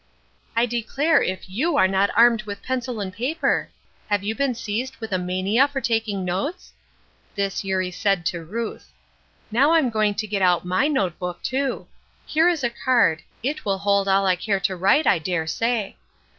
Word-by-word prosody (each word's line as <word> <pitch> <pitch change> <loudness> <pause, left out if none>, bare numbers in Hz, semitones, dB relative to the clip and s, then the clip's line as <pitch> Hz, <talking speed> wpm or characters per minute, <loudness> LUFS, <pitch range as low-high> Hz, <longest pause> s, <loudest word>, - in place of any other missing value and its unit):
"I 230 +1 +3
declare 245 +7 +1
if 185 0 -3
you 285 - 0
are 190 - +5
not 195 +1 +2
armed 235 -1 +6
with 205 -1 -6
a - - -28
pencil 250 -2 -3
and 190 -2 -5
paper. 255 - -1 0.4
Have 205 -1 0
you 210 +2 -1
been 265 0 0
seized 235 +4 -4
with 220 -2 -7
a 185 - +1
mania 185 +8 +2
for 285 -1 -4
taking 225 -6 -1
notes?" 240 - -3 0.6
This 200 -1 -2
Eurie 190 -1 -1
said 195 -2 0
to 170 0 -2
Ruth. 225 +7 -6 0.6
"Now 275 +8 +4
I'm 305 -7 +3
going 215 -2 +1
to 215 - -2
get 205 -2 -2
out 180 -2 +3
my 185 +10 +2
note 200 - -1
book 180 -1 -5
too. 265 +1 -2 0.4
Here 325 +3 +3
is 330 -6 -1
a 240 - +1
card 235 -10 +2 0.2
it 295 +4 -2
will 195 -1 0
hold 200 0 +1
all 195 0 +3
I 185 -1 +3
care 195 +2 -1
to 190 0 0
write 195 - +3
I - - +4
dare 165 0 -2
say. 225 +5 -1
210 Hz, 190 wpm, -23 LUFS, 190-250 Hz, 0.6 s, armed